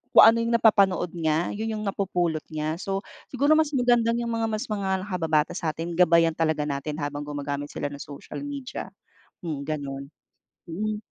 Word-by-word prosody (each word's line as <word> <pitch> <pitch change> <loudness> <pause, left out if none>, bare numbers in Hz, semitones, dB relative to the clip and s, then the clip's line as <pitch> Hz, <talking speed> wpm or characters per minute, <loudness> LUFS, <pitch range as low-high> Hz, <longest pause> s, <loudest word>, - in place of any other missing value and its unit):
kung - - +11
ano 225 +1 +7
yung 230 0 +1
napapanood 195 -6 +4
niya, 160 -1 0
yun 220 +1 -3
yung 215 - -4
napupulot 180 -5 0
niya. 155 +1 -3
So, 195 +1 -2 0.2
siguro 280 +3 +1
mas 300 -2 +1
magandang 240 -2 +3
yung 235 - -2
mga 225 0 0
mas 215 -1 -2
mga 190 -2 -1
nakababata 160 -6 +1
sa'tin 165 +1 -3
gabayan 170 -1 +5
talaga 160 -2 0
natin 145 +1 -3
habang 145 0 -4
gumagamit 145 0 -3
sila 145 -1 -4
ng 145 - -8
social 140 -1 -8
media. 280 -3 -5 0.5
Hmm 155 -5 -4
ganun, 140 -2 -5 0.6
mm. 210 +5 -2
175 Hz, 165 wpm, -26 LUFS, 155-215 Hz, 0.6 s, kung